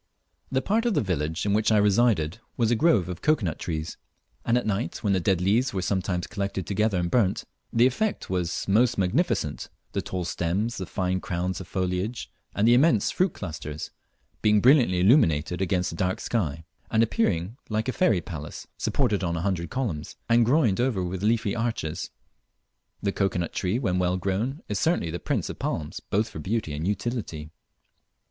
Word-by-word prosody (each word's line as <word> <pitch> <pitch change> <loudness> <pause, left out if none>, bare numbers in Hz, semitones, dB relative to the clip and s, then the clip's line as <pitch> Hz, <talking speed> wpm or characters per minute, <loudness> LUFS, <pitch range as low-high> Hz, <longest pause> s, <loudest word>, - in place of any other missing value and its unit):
The 130 0 +1
part 225 +4 +1
of 225 - +1
the - - +3
village 80 -4 -2
in 100 - +1
which 110 +1 +2
I 110 - +5
resided 105 -4 +3 0.2
was 115 -1 +2
a - - +4
grove 115 - +3
of 90 -1 -6
cocoa 155 -9 +2
nut 80 - -3
trees, 80 -2 -4 0.5
and 115 +1 +2
at 125 - -1
night, 105 +3 -2
when 100 -2 +2
the 95 - +2
dead 90 0 +1
leaves 105 +5 +2
were 95 - -1
sometimes 90 -2 -1
collected 100 -2 -3
together 105 +2 +1
and 85 -1 -1
burnt, 105 -7 +2 0.3
the 115 +1 +4
effect 200 +12 0
was 90 -2 -2
most 120 +4 +3
magnificent 95 - 0 0.2
the - - -1
tall 90 -2 -4
stems, 95 +8 -1
the 95 - -4
fine 95 0 -1
crowns 90 +1 -2
of 90 - -9
foliage, 95 +6 -2 0.2
and 105 +2 +3
the 120 - +7
immense 125 -4 +4
fruit 185 -2 +1
clusters, 75 -4 -6 0.5
being 105 -1 +4
brilliantly 120 -7 +5
illuminated 90 - +3
against 90 -2 0
a - - -7
dark 90 +2 -1
sky, 80 -9 -2 0.2
and 110 - +3
appearing 105 -2 0
like 110 +2 -1
a - - +1
fairy 110 - +2
palace 75 -3 -7
supported 100 -2 +1
on 85 -1 -1
a - - -2
hundred 85 -3 -1
columns, 90 - -3
and 115 -1 +4
groined 125 -7 +3
over 120 -8 +1
with 90 +1 -4
leafy 110 -1 +1
arches. 115 -9 -2 0.9
The 100 - +1
cocoa 95 -2 0
nut 85 -1 -2
tree, 95 +4 0
when 95 -8 0
well 90 0 +1
grown, 100 - -2
is 105 -2 -2
certainly 160 - +1
the 85 - -4
prince - - -1
of - - -7
palms 75 -2 -3
both 105 +3 -1
for 80 - -8
beauty 100 -2 -2
and 75 +4 -3
utility. 100 -7 -3
100 Hz, 190 wpm, -26 LUFS, 90-115 Hz, 0.9 s, the